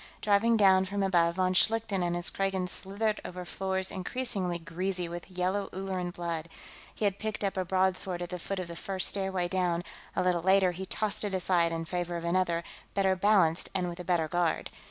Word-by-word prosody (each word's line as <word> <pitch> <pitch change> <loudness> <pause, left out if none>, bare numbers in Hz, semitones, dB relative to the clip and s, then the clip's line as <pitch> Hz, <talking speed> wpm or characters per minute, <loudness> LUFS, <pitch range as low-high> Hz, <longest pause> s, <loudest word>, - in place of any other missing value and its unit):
Driving 215 +3 +3
down 190 -2 +5
from 200 +1 -1
above, 170 -3 +3
von 185 0 +2
Schlichten 215 0 +2
and 175 0 0
his 175 0 -1
Kragans 190 -2 -1
slithered 210 +3 -1
over 180 0 -6
floors 190 +1 -1
increasingly 190 -3 -2
greasy 180 +2 -3
with 175 +1 -7
yellow 185 +2 -1
Ulleran 190 -1 -3
blood. 170 -2 -4 0.5
He 215 - -1
had 200 0 0
picked 215 -1 -3
up 195 - 0
a 185 - 0
broadsword 185 -1 +1
at 175 - -6
the 180 - -4
foot 195 +3 -4
of 185 -2 -3
the 170 - -7
first 190 +2 -1
stairway 190 -2 0
down; 175 -1 0 0.3
a - - +1
little 180 -2 +2
later, 190 +1 +4
he 190 +2 -6
tossed 215 +1 -1
it 200 -2 -1
aside 175 -2 +2
in 165 0 -3
favor 175 0 -2
of 170 - -5
another, 170 -1 +1 0.3
better 190 -1 +3
balanced 185 -4 +3
and 180 -2 0
with 170 +1 -7
a - - -4
better 170 -2 +1
guard. 175 0 0
185 Hz, 200 wpm, -30 LUFS, 175-195 Hz, 0.5 s, down